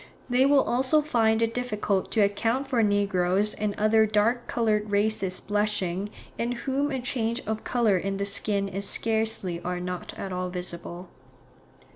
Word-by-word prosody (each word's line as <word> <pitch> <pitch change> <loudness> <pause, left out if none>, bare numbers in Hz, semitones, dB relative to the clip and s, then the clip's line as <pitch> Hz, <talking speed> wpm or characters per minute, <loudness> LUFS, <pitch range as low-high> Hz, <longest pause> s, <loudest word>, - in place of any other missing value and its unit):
They 255 +2 +4
will 280 -1 +5
also 265 +5 +2
find 225 -6 +2
it 230 0 0
difficult 210 -5 -1
to 220 - +3
account 225 +6 +1
for 250 -4 +1
negroes 200 -1 +2
and 210 -1 -2
other 220 +1 +4
dark 220 +3 +1
coloured 215 -2 0
races 200 -2 0
blushing, 205 -2 -1 0.3
in 235 +1 0
whom 270 +4 -1
a 265 -2 -2
change 240 -1 -1
of 220 0 -3
colour 225 -6 +2
in 195 +2 -2
the 200 - -1
skin 200 0 0
is 195 +1 +1
scarcely 220 -6 0
or 180 +1 -3
not 180 0 -5
at 190 -1 -5
all 180 0 -2
visible. 180 0 -6
210 Hz, 160 wpm, -26 LUFS, 195-235 Hz, 0.3 s, will